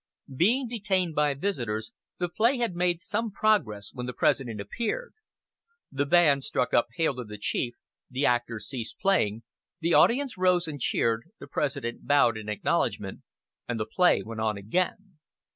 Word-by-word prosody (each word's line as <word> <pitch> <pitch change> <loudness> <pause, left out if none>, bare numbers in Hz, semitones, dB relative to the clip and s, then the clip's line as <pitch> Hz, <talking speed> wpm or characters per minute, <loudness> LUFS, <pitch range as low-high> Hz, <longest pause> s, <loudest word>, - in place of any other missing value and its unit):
Being 240 - +3
detained 195 -7 0
by 150 -1 +2
visitors, 120 - -2 0.3
the 175 - -1
play 230 +9 +2
had 235 -6 -1
made 175 -1 +1
some 225 +5 -2
progress 195 - +1
when 125 -1 -5
the 125 - -4
President 120 -6 +1
appeared.. 240 - -3 0.8
The 140 +1 -1
band 145 -4 +5
struck 125 - -1
up 120 - +4
"Hail 160 -3 +1
to 125 - -4
the 105 -2 -9
Chief," 120 +3 -2 0.3
the 130 +3 -1
actors 120 -2 0
ceased 125 -5 -6
playing, 115 - +1 0.4
the 170 0 +1
audience 255 -3 +3
rose 180 -2 +3
and 145 -4 -6
cheered, 115 -1 +1
the - - -8
President 120 0 -3
bowed 140 -5 +4
in 110 -1 -6
acknowledgment, 105 - -1 0.5
and 120 -2 -2
the 110 - -1
play 180 +11 +3
went 110 0 -6
on 110 -2 0
again. 180 - -2
145 Hz, 160 wpm, -27 LUFS, 115-185 Hz, 0.8 s, band